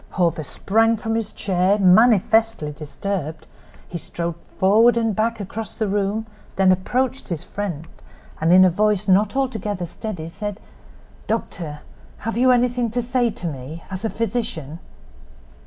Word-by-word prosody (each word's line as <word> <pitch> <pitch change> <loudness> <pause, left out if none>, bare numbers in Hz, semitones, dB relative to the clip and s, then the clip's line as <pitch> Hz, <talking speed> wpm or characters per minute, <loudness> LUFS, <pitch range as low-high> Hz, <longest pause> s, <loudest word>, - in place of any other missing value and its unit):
Hawver 170 -3 +1
sprang 225 +8 +1
from 225 +1 -3
his 225 -2 -1
chair, 190 +1 +1
manifestly 220 -2 +4
disturbed. 155 +1 -5 0.4
He 170 - -5
strode 170 +2 -4 0.2
forward 225 +5 +5
and 225 -3 +1
back 225 +1 0
across 210 +2 -6
the 220 - -1
room; 205 +2 -1 0.3
then 190 -1 +4
approached 250 +9 -1
his 170 -2 -3
friend, 180 -7 -5 0.6
and 165 +2 +3
in 185 +1 +8
a 185 - +4
voice 210 +2 +1
not 200 +3 +3
altogether 215 -8 -1
steady, 175 -2 -6
said: 205 +4 -5 0.7
"Doctor, 165 -9 -3 0.4
have 230 - -1
you 255 +2 +4
anything 245 -1 +2
to 245 +3 -1
say 245 0 +1
to 195 - -8
me—as 160 - -6
a 225 - 0
physician?" 195 - -3
205 Hz, 140 wpm, -22 LUFS, 175-225 Hz, 0.7 s, in